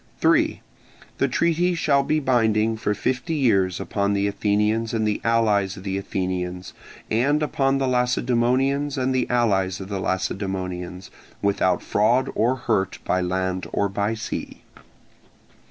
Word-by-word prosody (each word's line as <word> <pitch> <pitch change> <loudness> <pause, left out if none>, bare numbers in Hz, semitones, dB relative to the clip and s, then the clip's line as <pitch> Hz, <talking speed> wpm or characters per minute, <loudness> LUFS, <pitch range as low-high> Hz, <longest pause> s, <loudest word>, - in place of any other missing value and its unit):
3. - - +2 0.6
The - - +3
treaty 170 +2 +1
shall 145 -4 +2
be 155 +3 0
binding 115 -5 +2
for 105 -1 -1
fifty 130 - -2
years 95 - +2
upon 100 0 -1
the 100 0 +1
Athenians 105 +3 0
and 110 -1 +1
the 105 - -1
allies 105 -4 +2
of 95 - -10
the 95 -1 -3
Athenians, 90 -1 -4 0.4
and 140 +7 +2
upon 135 -2 +1
the 135 -1 0
Lacedaemonians 125 +3 +1
and 130 0 0
the 130 -1 0
allies 95 -6 +1
of 95 0 -8
the 100 -2 -3
Lacedaemonians, 95 -1 -3 0.3
without 95 -2 +1
fraud 120 +5 +2
or 120 +4 +2
hurt 110 -7 -1
by 90 - +1
land 95 0 -2
or 100 - +1
by 100 +3 -1
sea. 110 - -6
110 Hz, 140 wpm, -23 LUFS, 95-130 Hz, 0.6 s, The